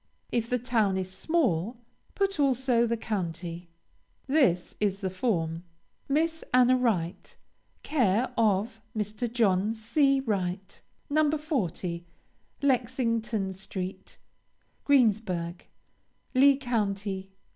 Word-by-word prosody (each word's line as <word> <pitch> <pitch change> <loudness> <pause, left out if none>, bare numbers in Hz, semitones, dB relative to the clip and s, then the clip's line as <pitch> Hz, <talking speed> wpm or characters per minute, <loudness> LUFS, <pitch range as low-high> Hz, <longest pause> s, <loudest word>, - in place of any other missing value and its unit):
If 230 -1 0
the 250 - +2
town 225 -6 +1
is 185 0 -3
small, 225 - 0 0.4
put 395 -4 0
also 255 -3 +3
the 235 0 0
county. 175 -5 -4 0.6
This 260 - +2
is 200 -1 0
the 190 -2 -2
form: 170 -6 -1 0.5
MISS 320 +3 +1
ANNA 255 0 +6
WRIGHT, 195 -9 -1 0.5
Care 245 -3 +1
of 220 0 +1 0.2
Mr. 215 +3 -2
John 215 -2 +2
C. 275 +5 +2
Wright, 195 -6 -3 0.3
No. 305 +1 +3
40, 210 - -2 0.6
Lexington 230 -6 0
street, 190 0 -6 0.7
Greensburg 205 -10 +1 0.7
Lee 275 +1 +6
County. 200 -6 -2
220 Hz, 100 wpm, -28 LUFS, 190-255 Hz, 0.7 s, ANNA